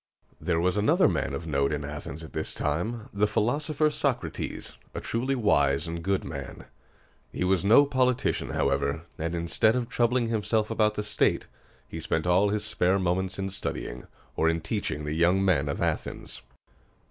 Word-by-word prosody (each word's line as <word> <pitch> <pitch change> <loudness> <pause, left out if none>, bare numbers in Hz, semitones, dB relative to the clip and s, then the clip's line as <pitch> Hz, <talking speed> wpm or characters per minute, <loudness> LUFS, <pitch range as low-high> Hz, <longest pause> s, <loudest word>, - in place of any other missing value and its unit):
There 85 -2 0
was 90 +3 +1
another 105 +1 +4
man - - -1
of 80 - -5
note 70 -3 +1
in 75 -1 -2
Athens 75 +1 -7
at 80 - -11
this 80 - -3
time, 105 - -2
the 100 +1 +2
philosopher 150 +8 +1
Socrates, 125 - -3 0.2
a - - -2
truly 130 +4 -1
wise 75 - +2
and 85 0 -4
good 95 +2 0
man. 70 -3 -7 0.7
He - - -2
was 95 -1 +2
no 115 +8 +7
politician, 130 -3 +1
however; 70 +3 0 0.2
and, 85 +2 -2
instead 85 +7 +2
of 125 -2 -1
troubling 120 -1 +1
himself 110 -1 0
about 105 -1 +2
the 105 - -2
state, 105 0 +1 0.4
he 80 - -6
spent 80 0 -1
all 90 +3 +4
his 105 0 -1
spare 90 +2 +2
moments 95 +1 -1
in 95 0 -3
studying, 65 -8 -5 0.3
or 80 - +3
in 80 0 0
teaching 75 - -3
the 75 - -2
young 90 +4 +3
men 75 -7 +2
of 70 - -2
Athens. - - -3
95 Hz, 170 wpm, -27 LUFS, 80-110 Hz, 0.7 s, no